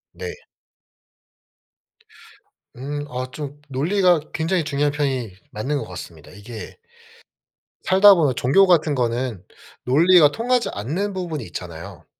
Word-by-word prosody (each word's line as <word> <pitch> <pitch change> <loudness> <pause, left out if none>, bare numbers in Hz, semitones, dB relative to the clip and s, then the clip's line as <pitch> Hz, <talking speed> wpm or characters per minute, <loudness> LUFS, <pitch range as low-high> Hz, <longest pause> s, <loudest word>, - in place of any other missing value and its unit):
네. - - -6 2.5
음. 145 +3 -5
어 130 -1 -5
좀 145 -1 -8
논리가 175 +6 +2
굉장히 165 +2 0
중요한 145 0 0
편이 135 -8 -2 0.2
맞는 135 +8 -2
것 - - -4
같습니다. 85 -3 -10
이게 110 +2 -10 1.1
살다 200 +2 +7
보면 145 -7 +1
종교 165 +13 +4
같은 160 -5 +3
거는 120 -4 -2 0.4
논리가 155 +3 +5
통하지 245 +1 0
않는 165 - -3
부분이 170 -8 -4
있잖아요. 85 -2 -9
145 Hz, 240 characters per minute, -22 LUFS, 125-175 Hz, 2.5 s, 살다